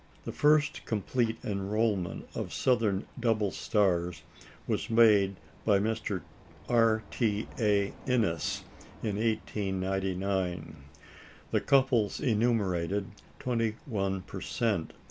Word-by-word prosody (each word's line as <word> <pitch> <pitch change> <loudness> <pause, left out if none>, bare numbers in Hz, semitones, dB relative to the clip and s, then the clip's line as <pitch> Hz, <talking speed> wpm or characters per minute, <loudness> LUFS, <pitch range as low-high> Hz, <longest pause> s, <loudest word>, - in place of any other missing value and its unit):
The - - -3
first 150 0 +3
complete 115 +2 0
enrolment 100 -3 -1
of - - -4
southern 110 -6 +2
double 110 -4 +1
stars 90 -6 0 0.4
was - - -2
made 105 -4 +5 0.3
by 105 -2 +4
Mr. 105 -2 -1 0.4
R. 115 -2 +3
T. 110 -3 0
A. 100 -3 +2
Innes 110 - 0 0.4
in 105 -3 -1
1899. 95 -4 -1 0.8
The - - +2
couples 130 -6 +3
enumerated, 100 -5 +1 0.3
twenty 115 -3 -1
one 95 -6 -1
per - - -8
cent. 105 -9 -1
105 Hz, 100 wpm, -30 LUFS, 95-115 Hz, 0.8 s, made